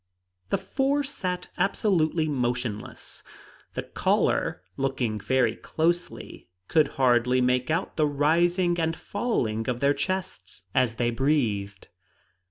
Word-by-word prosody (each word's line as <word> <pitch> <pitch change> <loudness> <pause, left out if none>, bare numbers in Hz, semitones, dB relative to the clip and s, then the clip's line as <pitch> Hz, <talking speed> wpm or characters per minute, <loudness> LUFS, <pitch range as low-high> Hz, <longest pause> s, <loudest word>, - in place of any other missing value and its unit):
The - - +2
four 275 +2 0
sat 185 -10 -3
absolutely 175 -5 +2
motionless; 120 -6 -3 0.5
the - - -2
caller, 90 - 0
looking 130 -5 -1
very 120 0 +2
closely, 170 - -2 0.2
could 155 -2 +4
hardly 125 -1 +3
make 125 0 +1
out 165 +4 -1
the 155 -2 +3
rising 175 +5 +2
and 165 0 0
falling 120 - -1
of 125 -1 -1
their 140 +1 +3
chests 145 - -4
as 125 -3 +2
they 120 0 +1
breathed. 115 -8 0
140 Hz, 115 wpm, -26 LUFS, 120-175 Hz, 0.5 s, could